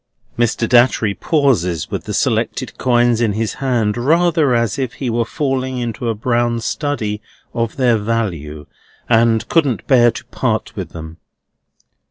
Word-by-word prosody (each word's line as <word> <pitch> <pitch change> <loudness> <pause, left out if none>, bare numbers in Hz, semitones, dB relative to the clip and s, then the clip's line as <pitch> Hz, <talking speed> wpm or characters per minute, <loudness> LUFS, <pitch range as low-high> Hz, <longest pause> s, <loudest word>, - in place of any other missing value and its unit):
Mr. 120 -1 0
Datchery 120 -4 +3
pauses 105 - 0
with - - -4
the - - -4
selected - - -1
coins 120 -2 +2
in 110 -3 +1
his 110 +1 -2
hand, 120 -6 +1
rather 155 +1 +2
as 115 -1 0
if 130 -3 -2
he 130 -4 -3
were 115 +1 +1
falling 130 -1 -2
into 120 -1 -3
a 115 - -1
brown 120 +1 0
study 115 -5 -3 0.3
of 115 -1 -2
their 120 -4 +2
value, 85 -10 -3 0.4
and 115 -1 +3
couldn't 145 -9 +1
bear 120 -4 +5
to 120 - -7
part 110 -3 -2
with 95 -6 -5
them. 80 -1 -9
120 Hz, 150 wpm, -18 LUFS, 110-130 Hz, 0.4 s, bear